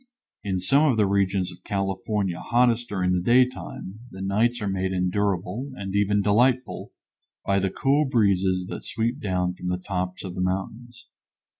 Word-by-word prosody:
In 95 Hz, -2 st, -1 dB
some 140 Hz, +12 st, +3 dB
of 115 Hz, -, -1 dB
the 105 Hz, -, +4 dB
regions 95 Hz, -1 st, +1 dB
of 90 Hz, +1 st, -15 dB
California 95 Hz, -1 st, -2 dB
hottest 120 Hz, +1 st, +2 dB
during 90 Hz, -2 st, 0 dB
the 90 Hz, -1 st, +1 dB
day 120 Hz, +6 st, +5 dB
time, 110 Hz, -5 st, -9 dB
the 95 Hz, -3 st, -8 dB
nights 115 Hz, +5 st, +1 dB
are 105 Hz, -, -3 dB
made 95 Hz, -1 st, -1 dB
endurable, 95 Hz, +6 st, -1 dB
and 95 Hz, -2 st, -5 dB
even 100 Hz, 0 st, +2 dB
delightful, 125 Hz, +5 st, +1 dB, 0.5 s
by 100 Hz, 0 st, +2 dB
the 95 Hz, 0 st, 0 dB
cool 145 Hz, +7 st, +2 dB
breezes 95 Hz, -7 st, +2 dB
that -, -, -6 dB
sweep 115 Hz, +2 st, -2 dB
down 90 Hz, -2 st, -1 dB
from 90 Hz, 0 st, -7 dB
the 90 Hz, 0 st, 0 dB
tops 90 Hz, 0 st, -4 dB
of 95 Hz, -2 st, -6 dB
the 90 Hz, -, -4 dB
mountains. 110 Hz, +6 st, -4 dB
100 Hz, 170 wpm, -25 LUFS, 95-115 Hz, 0.5 s, day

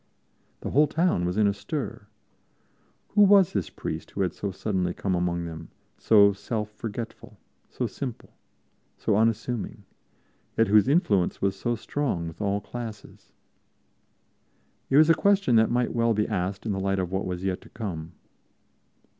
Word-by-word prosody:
The -, -, -4 dB
whole 150 Hz, +3 st, +5 dB
town 160 Hz, -, +1 dB
was 90 Hz, +3 st, -2 dB
in 110 Hz, -, +4 dB
a 100 Hz, -, +3 dB
stir. 105 Hz, +1 st, -5 dB, 1.0 s
Who 210 Hz, -, +3 dB
was 200 Hz, -3 st, +6 dB
this 95 Hz, -6 st, -1 dB
priest -, -, -6 dB
who 100 Hz, -, -4 dB
had 90 Hz, -3 st, 0 dB
so 100 Hz, -, -4 dB
suddenly 95 Hz, -2 st, -2 dB
come 95 Hz, -, -2 dB
among 85 Hz, -1 st, -1 dB
them, 80 Hz, -1 st, -8 dB, 0.3 s
so 100 Hz, -2 st, +6 dB
self 105 Hz, +1 st, -4 dB
forgetful, 115 Hz, +1 st, -7 dB, 0.3 s
so -, -, -3 dB
simple, 125 Hz, -5 st, -6 dB, 0.7 s
so -, -, 0 dB
unassuming, 115 Hz, +1 st, -1 dB, 0.7 s
yet 115 Hz, -2 st, +3 dB
whose 105 Hz, +2 st, +5 dB
influence 110 Hz, -, +2 dB
was 95 Hz, 0 st, 0 dB
so 120 Hz, +5 st, -1 dB
strong 110 Hz, -, -2 dB
with 80 Hz, +4 st, -9 dB
all 100 Hz, 0 st, 0 dB
classes? 115 Hz, -3 st, -9 dB, 1.6 s
It 135 Hz, -, +4 dB
was 155 Hz, +2 st, +7 dB
a -, -, +7 dB
question 200 Hz, -, +3 dB
that 110 Hz, -, +4 dB
might 120 Hz, 0 st, 0 dB
well 115 Hz, -1 st, +2 dB
be 105 Hz, 0 st, +1 dB
asked 95 Hz, +3 st, -3 dB
in 110 Hz, -, -1 dB
the 95 Hz, -, -2 dB
light 95 Hz, 0 st, 0 dB
of 90 Hz, -2 st, -2 dB
what 95 Hz, 0 st, -2 dB
was 90 Hz, 0 st, -4 dB
yet 95 Hz, -1 st, -2 dB
to -, -, -16 dB
come. 85 Hz, -7 st, -6 dB
105 Hz, 165 wpm, -26 LUFS, 95-120 Hz, 1.6 s, was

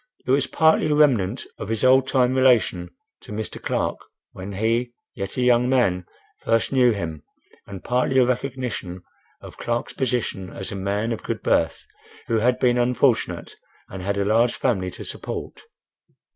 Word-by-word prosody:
It -, -, 0 dB
was 135 Hz, 0 st, +3 dB
partly 160 Hz, +1 st, +3 dB
a 150 Hz, -, +2 dB
remnant 125 Hz, -7 st, +2 dB
of 105 Hz, -, -6 dB
his 115 Hz, +1 st, -2 dB
old 130 Hz, +1 st, +5 dB
time 130 Hz, -2 st, +2 dB
relation 125 Hz, -9 st, +3 dB, 0.3 s
to -, -, -13 dB
Mr. 105 Hz, +1 st, -5 dB
Clark -, -, -1 dB, 0.3 s
when 95 Hz, +2 st, -8 dB
he, 115 Hz, +4 st, 0 dB, 0.2 s
yet 100 Hz, +4 st, -6 dB
a -, -, +1 dB
young 125 Hz, 0 st, +3 dB
man, 95 Hz, -9 st, +1 dB, 0.3 s
first 115 Hz, -1 st, 0 dB
knew 125 Hz, -3 st, +4 dB
him, 80 Hz, -8 st, -4 dB, 0.5 s
and 100 Hz, -2 st, -9 dB
partly 125 Hz, +2 st, +1 dB
a 130 Hz, -, +6 dB
recognition 125 Hz, -8 st, -3 dB, 0.4 s
of -, -, -12 dB
Clark's 120 Hz, 0 st, -3 dB
position 120 Hz, -7 st, -2 dB
as 95 Hz, -, -7 dB
a -, -, -5 dB
man 100 Hz, +4 st, -2 dB
of 115 Hz, -, -3 dB
good -, -, -4 dB
birth -, -, +1 dB, 0.4 s
who 115 Hz, -, 0 dB
had 125 Hz, +3 st, +2 dB
been 125 Hz, -1 st, +2 dB
unfortunate, 120 Hz, -8 st, +1 dB, 0.3 s
and 95 Hz, -, -7 dB
had 100 Hz, +2 st, -2 dB
a 100 Hz, -, 0 dB
large 115 Hz, +3 st, +3 dB
family 95 Hz, -8 st, 0 dB
to -, -, -9 dB
support. -, -, -6 dB
120 Hz, 170 wpm, -23 LUFS, 100-125 Hz, 0.5 s, a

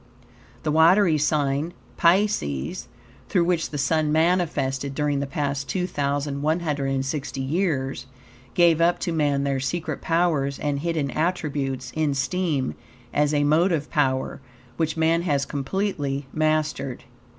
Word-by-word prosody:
The 155 Hz, -, 0 dB
watery 165 Hz, +1 st, +5 dB
sign, 150 Hz, +2 st, 0 dB, 0.2 s
Pisces, 170 Hz, -, +1 dB, 0.4 s
through 180 Hz, -4 st, +3 dB
which 170 Hz, -1 st, 0 dB
the 145 Hz, -, -5 dB
Sun 150 Hz, +1 st, +1 dB
manifested 150 Hz, -5 st, +1 dB
during 145 Hz, -1 st, 0 dB
the 140 Hz, -, -2 dB
past 140 Hz, -1 st, -2 dB
2,160 145 Hz, -3 st, -1 dB
years, 135 Hz, -4 st, -1 dB, 0.5 s
gave 170 Hz, -2 st, +5 dB
up 175 Hz, +1 st, +4 dB
to 170 Hz, -, -2 dB
man 145 Hz, -3 st, +1 dB
their 140 Hz, -1 st, 0 dB
secret 160 Hz, +6 st, -3 dB
powers 160 Hz, -5 st, +1 dB
and 145 Hz, -1 st, -1 dB
hidden 155 Hz, -3 st, -1 dB
attributes 140 Hz, -6 st, -2 dB
in 155 Hz, -3 st, +1 dB
steam 140 Hz, -1 st, -1 dB, 0.4 s
as 150 Hz, 0 st, +2 dB
a 145 Hz, -1 st, +2 dB
motive 155 Hz, +1 st, +2 dB
power, 130 Hz, -4 st, 0 dB, 0.3 s
which 160 Hz, +1 st, -1 dB
man 165 Hz, +1 st, +3 dB
has 145 Hz, -5 st, 0 dB
completely 145 Hz, -2 st, -2 dB
mastered. 155 Hz, -4 st, 0 dB
150 Hz, 120 wpm, -24 LUFS, 140-165 Hz, 0.5 s, watery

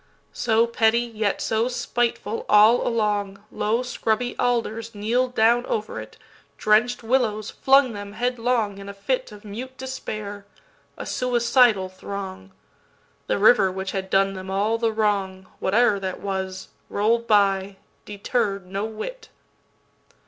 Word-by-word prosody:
So 225 Hz, 0 st, +2 dB
petty 235 Hz, 0 st, +2 dB
yet 220 Hz, -4 st, -2 dB
so 225 Hz, +2 st, +1 dB
spiteful 240 Hz, -3 st, -2 dB
All 215 Hz, +3 st, +6 dB
along, 205 Hz, -3 st, -1 dB
Low 225 Hz, +4 st, 0 dB
scrubby 245 Hz, -1 st, -1 dB
alders 230 Hz, -2 st, -1 dB
kneel'd 245 Hz, +5 st, 0 dB
down 235 Hz, +2 st, +4 dB
over 215 Hz, -1 st, -3 dB
it; -, -, -12 dB, 0.4 s
Drench'd 220 Hz, +3 st, +2 dB
willows 225 Hz, -3 st, 0 dB
flung 270 Hz, -2 st, +4 dB
them 205 Hz, -1 st, -7 dB
headlong 235 Hz, -3 st, -1 dB
in 200 Hz, 0 st, -8 dB
a 200 Hz, -, -8 dB
fitOf 210 Hz, 0 st, -3 dB
mute 245 Hz, +6 st, -8 dB
despair, 215 Hz, -6 st, -6 dB, 0.5 s
a -, -, -6 dB
suicidal 240 Hz, -4 st, +2 dB
throng:The 185 Hz, -, -8 dB
river 205 Hz, -2 st, +5 dB
which 190 Hz, +1 st, -4 dB
had 190 Hz, -1 st, -4 dB
done 195 Hz, 0 st, +2 dB
them 190 Hz, 0 st, -8 dB
all 210 Hz, +4 st, 0 dB
the 230 Hz, -1 st, +1 dB
wrong, 200 Hz, -3 st, -1 dB
Whate'er 210 Hz, +1 st, +3 dB
that 190 Hz, -1 st, -4 dB
was, 190 Hz, -1 st, -4 dB, 0.2 s
roll'd 230 Hz, +3 st, +1 dB
by, 195 Hz, -2 st, +2 dB, 0.3 s
deterr'd 200 Hz, -1 st, -2 dB
no 195 Hz, +3 st, -3 dB
whit. 455 Hz, -, -7 dB
215 Hz, 125 wpm, -23 LUFS, 200-240 Hz, 0.5 s, All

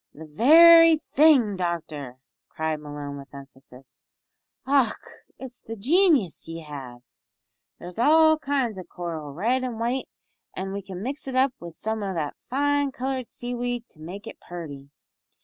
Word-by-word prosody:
"The 160 Hz, -, -10 dB
very 325 Hz, -, +7 dB, 0.2 s
thing, 270 Hz, -9 st, +5 dB
doctor," 155 Hz, -7 st, -4 dB, 0.3 s
cried 160 Hz, 0 st, -2 dB
Malone, 145 Hz, -1 st, -7 dB
with 140 Hz, +1 st, -13 dB
emphasis, 135 Hz, -1 st, -15 dB, 0.6 s
"och! 270 Hz, -5 st, +2 dB, 0.4 s
it's 255 Hz, -2 st, -10 dB
the 225 Hz, -, -7 dB
genius 285 Hz, -, +2 dB
ye 165 Hz, 0 st, -7 dB
have! 135 Hz, -5 st, -9 dB, 0.7 s
There's 180 Hz, +4 st, -10 dB
all 315 Hz, +4 st, +5 dB
kinds 265 Hz, -9 st, -1 dB
o' -, -, -7 dB
coral, 165 Hz, -5 st, -6 dB
red 235 Hz, -, 0 dB
and 240 Hz, -3 st, -4 dB
white, 245 Hz, +3 st, -2 dB, 0.5 s
an' 195 Hz, +1 st, -4 dB
we 200 Hz, -, -4 dB
could 190 Hz, -1 st, -9 dB
mix 270 Hz, +9 st, -5 dB
it 265 Hz, -, -4 dB
up 265 Hz, 0 st, +3 dB
wi' 170 Hz, -, -8 dB
some 220 Hz, +6 st, -4 dB
o' 195 Hz, -2 st, -3 dB
that 150 Hz, -3 st, -2 dB, 0.2 s
fine 285 Hz, +1 st, +1 dB
coloured 260 Hz, -1 st, -4 dB
seaweed 245 Hz, 0 st, -4 dB
to 155 Hz, -, -19 dB
make 185 Hz, +7 st, -9 dB
it 225 Hz, -, -10 dB
purty." 145 Hz, -6 st, -9 dB
210 Hz, 150 wpm, -25 LUFS, 160-265 Hz, 0.7 s, very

